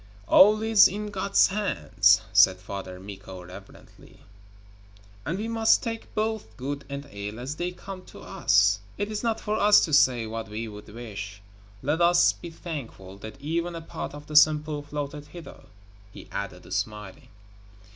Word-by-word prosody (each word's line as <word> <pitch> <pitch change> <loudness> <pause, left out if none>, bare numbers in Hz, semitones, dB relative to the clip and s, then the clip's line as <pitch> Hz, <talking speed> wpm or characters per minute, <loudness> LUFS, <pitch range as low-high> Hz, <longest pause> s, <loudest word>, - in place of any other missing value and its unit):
'All 215 +2 +6
is 220 -2 +7
in 210 +2 -5
God's 195 0 +3
hands,' 190 - +2
said 95 - +6
Father 95 -1 -7
Mikko 95 -1 -10
reverently, 95 +2 -15 1.1
'and 170 +5 -1
we 215 +3 -3
must 225 -1 +3
take 225 -2 -5
both 220 0 -3
good 140 +2 -4
and 140 +1 -6
ill 105 +1 -6
as 130 +5 -5
they 175 +1 -2
come 185 +1 -9
to - - -13
us 100 +2 +2 0.2
it 205 +1 -3
is 210 - -3
not 225 -2 -1
for 210 0 -2
us 205 0 +7
to 155 - -6
say 125 -5 +4
what 110 0 -6
we 110 +2 -5
would 105 0 -11
wish. 105 -3 -8 0.4
Let 150 +5 0
us 175 +1 +5
be 170 - -10
thankful 120 - -8
that 110 +1 -10
even 170 +3 -2
a 165 - -6
part 160 - -7
of 145 0 -10
the 150 - -8
Sampo 150 0 +4
floated 145 0 -6
hither,' 170 +2 -12 0.5
he - - -12
added, - - -6
smiling. 105 -3 -4
145 Hz, 165 wpm, -26 LUFS, -, 1.1 s, is